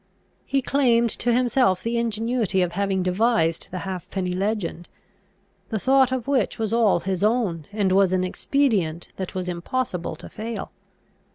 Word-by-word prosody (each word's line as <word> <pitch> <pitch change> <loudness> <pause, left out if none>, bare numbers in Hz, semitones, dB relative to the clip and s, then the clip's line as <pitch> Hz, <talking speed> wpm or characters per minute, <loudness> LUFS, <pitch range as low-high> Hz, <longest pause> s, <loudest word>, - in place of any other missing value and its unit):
He 275 -1 +1
claimed 235 -5 +3
to 240 - 0
himself 245 -5 +2
the 235 +1 0
ingenuity 225 -4 0
of 175 - -2
having 195 0 0
devised 185 -3 +1
the 185 - -5
halfpenny 185 0 -3
legend, 190 -3 -2 0.8
the 220 - -1
thought 265 +3 +3
of 260 -2 -2
which 270 -6 +1
was 220 -1 -2
all 220 -7 +3
his 190 +1 -2
own, 210 -8 +1
and 205 -3 0
was 190 -1 +4
an 185 -1 +1
expedient 185 - 0
that 190 -1 -5
was 185 -1 -3
impossible 180 +1 -3
to - - -11
fail. 225 +1 -6
205 Hz, 155 wpm, -24 LUFS, 185-235 Hz, 0.8 s, was